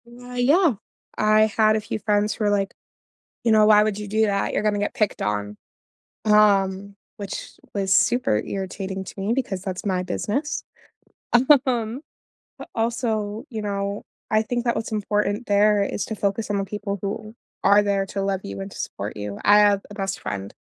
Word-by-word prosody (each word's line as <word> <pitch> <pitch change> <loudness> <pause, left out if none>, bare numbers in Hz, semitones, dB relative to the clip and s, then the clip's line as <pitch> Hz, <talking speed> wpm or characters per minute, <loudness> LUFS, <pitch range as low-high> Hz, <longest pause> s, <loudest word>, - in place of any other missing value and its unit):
Uh, 245 +1 -12
yeah. 290 +6 +4 0.4
I 215 0 +4 0.2
had 215 -1 +5
a 215 - 0
few 210 +1 -4
friends 210 +1 +1
who 220 - -4
were - - +3
like, 200 -1 0 0.7
"You 230 - +4
know, 215 -1 +6
why 210 -1 +7
would 210 -1 -1
you 210 -1 -6
do 215 +2 +1
that? 200 -1 0
You're - - 0
gonna 210 -1 +1
get 205 - -1
picked 215 -6 0
on." 105 0 -2 0.7
Um, 200 -2 +3 0.2
which 200 -3 -6 0.2
was 195 -2 +1
super 235 - +3
irritating 190 0 -5
to 190 - -9
me 200 +4 0
because 230 -8 -2
that's 190 +2 -5
my 185 -2 0
business. 225 - -2 1.0
Um, 235 0 -1 0.6
but - - -10
also, 225 -1 -1
you 225 -4 -4
know, 200 0 -3 0.3
I 215 0 +4
think 240 +2 -2
that 235 - +1
what's 225 - -3
important 210 +1 -1
there 205 0 +4
is 200 - -3
to 220 - -5
focus 200 +1 -1
on 205 - 0
the 195 - -1
people 200 0 -4
who 215 +2 -5 0.3
are 200 +1 +6
there 200 -1 +1
to 195 +1 -3
love 195 -1 -1
you 100 0 -6
and 95 - -6
to - - -11
support - - -5
you; 105 -1 -5
I 205 +1 +6
have 205 -1 +4
a 205 - -10
best 195 -2 -3
friend 100 -1 -5
205 Hz, 190 wpm, -23 LUFS, 195-220 Hz, 1.0 s, why